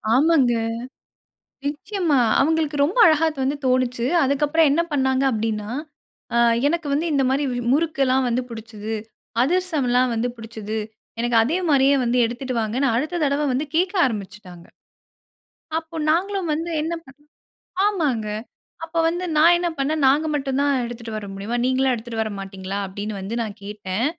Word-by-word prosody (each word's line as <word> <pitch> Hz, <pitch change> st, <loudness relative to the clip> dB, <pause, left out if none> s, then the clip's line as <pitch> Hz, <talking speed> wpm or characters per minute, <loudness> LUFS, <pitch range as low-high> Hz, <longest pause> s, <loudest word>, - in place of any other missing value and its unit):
ஆமாங்க. 280 Hz, -4 st, +4 dB, 1.1 s
நிச்சயமா. 305 Hz, +1 st, 0 dB, 0.2 s
அவங்களுக்கு 310 Hz, 0 st, +1 dB
ரொம்ப 345 Hz, +12 st, -1 dB
அழகா 315 Hz, 0 st, +5 dB
அது 300 Hz, -, -11 dB
வந்து 280 Hz, +2 st, 0 dB
தோணுச்சு. 255 Hz, -1 st, +1 dB, 0.2 s
அதுக்கப்பறம் 295 Hz, +3 st, +3 dB
என்ன 330 Hz, -, +3 dB
பண்ணாங்க 265 Hz, -2 st, +1 dB
அப்படீன்னா, 215 Hz, -2 st, -2 dB, 0.7 s
அ -, -, +3 dB, 0.3 s
எனக்கு 330 Hz, 0 st, -1 dB
வந்து 310 Hz, +4 st, 0 dB
இந்த 275 Hz, -, +2 dB
மாரி 275 Hz, +2 st, +1 dB
வ் 245 Hz, -, -2 dB
முறுக்கு 310 Hz, -1 st, +1 dB
எல்லாம் 260 Hz, 0 st, +2 dB
வந்து 240 Hz, +2 st, 0 dB
புடிச்சுது. 225 Hz, -1 st, -7 dB, 0.5 s
அதிரசமல்லாம் 270 Hz, -6 st, +1 dB
வந்து 230 Hz, +2 st, 0 dB
புடிச்சுது. 220 Hz, -1 st, -6 dB, 0.4 s
எனக்கு 240 Hz, 0 st, +1 dB
அதே 300 Hz, +10 st, 0 dB
மாரியே 275 Hz, 0 st, +4 dB
வந்து 245 Hz, +1 st, +1 dB
எடுத்துட்டு 245 Hz, +3 st, -4 dB
வாங்கன்னு, 245 Hz, +6 st, 0 dB
அடுத்த 310 Hz, +8 st, -1 dB
தடவ 285 Hz, +1 st, +1 dB
வந்து 275 Hz, +5 st, -1 dB
கேட்க 365 Hz, +4 st, +1 dB
ஆரம்பிச்சுட்டாங்க. 195 Hz, -6 st, -6 dB, 1.1 s
அப்போ 325 Hz, 0 st, -14 dB, 0.2 s
நாங்களும் 375 Hz, +1 st, 0 dB
வந்து 330 Hz, +3 st, -3 dB
என்னப் 330 Hz, -1 st, -4 dB, 0.8 s
ஆமாங்க. 295 Hz, -, 0 dB, 0.6 s
அப்ப 335 Hz, +1 st, -7 dB
வந்து 350 Hz, +2 st, -1 dB
நா 305 Hz, -, +5 dB
என்ன 350 Hz, 0 st, -1 dB
பண்ணேன், 290 Hz, +2 st, 0 dB
"நாங்க 295 Hz, +4 st, +3 dB
மட்டும் 270 Hz, -2 st, -1 dB
தான் 285 Hz, 0 st, +2 dB
எடுத்துட்டு 235 Hz, -1 st, -7 dB
வர 210 Hz, -, -6 dB
முடியுமா? 200 Hz, +5 st, -3 dB
நீங்களும் 260 Hz, 0 st, +2 dB
எடுத்துட்டு 230 Hz, -1 st, -4 dB
வர 215 Hz, -, -5 dB
மாட்டீங்களா?" 195 Hz, 0 st, -5 dB
அப்படீன்னு 205 Hz, +2 st, -5 dB
வந்து 200 Hz, +5 st, -4 dB
நா 225 Hz, -, -2 dB, 0.2 s
கேட்டேன். 205 Hz, +1 st, -3 dB
265 Hz, 150 wpm, -22 LUFS, 225-310 Hz, 1.1 s, அழகா